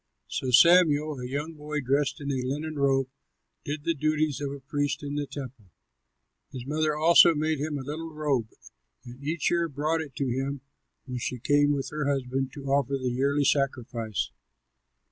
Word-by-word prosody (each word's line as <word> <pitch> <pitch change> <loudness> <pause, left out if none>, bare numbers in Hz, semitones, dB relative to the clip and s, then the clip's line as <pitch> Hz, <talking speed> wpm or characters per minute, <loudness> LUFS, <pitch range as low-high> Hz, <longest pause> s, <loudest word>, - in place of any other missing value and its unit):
So 130 - -3
Samuel 155 0 +5
a 125 - -5
young 145 +5 -3
boy 150 -1 -4
dressed 140 +2 0
in 140 -1 -3
a 130 -2 -1
linen 150 +3 -3
robe 135 -1 +2 0.6
did 145 +1 -4
the 165 - +1
duties 155 -1 0
of 140 -1 -2
a 140 - -7
priest 145 +1 -2
in 145 0 -4
the 145 -1 -2
temple. 130 -6 -8 0.9
His 125 -2 -7
mother 155 +1 0
also 165 +2 +7
made 155 0 0
him 150 0 -2
a 135 - -5
little 160 +4 -5
robe 145 -7 0 0.6
and 125 +3 -11
each 160 +3 0
year 170 -1 +1
brought 155 +3 -1
it 145 -4 -9
to 140 - -1
him 135 +2 -2 0.4
when 125 -2 -5
she 125 - -3
came 145 +4 +3
up - - 0
with 135 - -3
her 150 -2 -1
husband 135 -1 -2
to 140 -2 -9
offer 140 0 +1
the 130 -2 -2
yearly 140 +3 +1
sacrifice. 125 - -1
140 Hz, 185 wpm, -27 LUFS, 135-150 Hz, 0.9 s, also